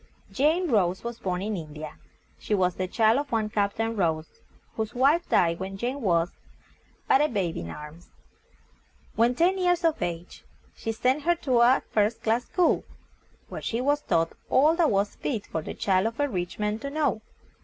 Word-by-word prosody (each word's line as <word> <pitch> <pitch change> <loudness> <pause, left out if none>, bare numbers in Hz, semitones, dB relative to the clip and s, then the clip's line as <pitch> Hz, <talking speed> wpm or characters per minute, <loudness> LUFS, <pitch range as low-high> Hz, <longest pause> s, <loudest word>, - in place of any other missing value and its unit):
Jane 320 +6 +2
Rose 185 -4 +2
was 235 -1 -5
born 180 0 -2
in 215 +1 -2
IN 155 -4 -7
DI 155 - -8
A. - - -15 0.5
She 210 - -1
was 180 -2 +2
the 185 +1 -3
child 220 +5 +3
of 285 -1 -5
one 220 -2 0
Cap 200 -1 0
tain 225 0 -1
Rose, 160 -5 -2 0.3
whose 220 0 -3
wife 285 +7 +3
died 170 -1 +2
when 190 +1 -5
Jane 250 +6 -3
was 170 -4 +1 0.8
but 270 - +5
a 300 - +4
babe 190 -7 -1
in 85 0 -5
arms. 150 - -10 1.1
When 235 +2 +3
ten 365 +6 +2
years 355 -1 +2
of 325 -2 +1
age 175 0 -5 0.3
he 225 - -4
sent 255 +6 +1
her 345 +3 +2
to 255 -3 +3
a 245 +2 +5
first 215 +1 +1
class 230 +2 +1
school, 355 -2 +2 0.6
where - - -7
she 230 - -2
was 290 +3 +1
taught 165 - 0 0.2
all 305 +5 +4
that 335 -3 +3
was 200 0 +1
fit 225 -7 -3
for 160 - -4
the - - -7
child 190 +1 +1
of 230 +3 -6
a 290 - +2
rich 180 -8 -4
man 210 +1 -1
to 280 - -5
know. 285 -6 0
220 Hz, 195 wpm, -26 LUFS, 185-275 Hz, 1.1 s, but